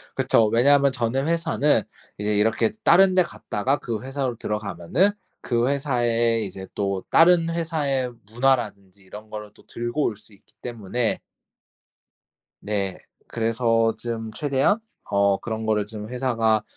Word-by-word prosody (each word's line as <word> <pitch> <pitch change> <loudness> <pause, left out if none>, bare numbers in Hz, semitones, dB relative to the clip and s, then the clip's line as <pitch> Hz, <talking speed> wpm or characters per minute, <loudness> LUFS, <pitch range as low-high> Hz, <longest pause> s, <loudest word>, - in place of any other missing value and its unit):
그쵸. 115 - +3
왜냐하면 140 +5 +4
전에 125 +1 -1
회사는 160 -5 +1 0.4
이제 105 0 0
이렇게 110 - +2
다른 185 +2 +6
데 185 - +5
갔다가 135 -5 -2
그 110 -3 -4
회사로 135 -2 -3
들어가면은 105 - 0 0.3
그 120 0 0
회사의 120 -5 +1
이제 95 0 -8
또 100 -2 -2
다른 165 0 +5
회사의 150 -6 -1 0.2
문화라든지 110 -6 -1
이런 105 +3 -11
거를 105 -1 -7
또 - - -21
들고 120 +5 -3
올 110 - -1
수 105 +1 -18
있기 100 - -26
때문에 115 0 -2 1.4
네 100 -2 -2 0.3
그래서 115 0 +1
좀 115 -2 -5
최대한 140 - +1 0.3
어 100 0 +3
그런 110 -1 -5
거를 105 -1 +1
좀 105 0 -8
회사가 115 -4 +1
115 Hz, 285 characters per minute, -24 LUFS, 105-135 Hz, 1.4 s, 다른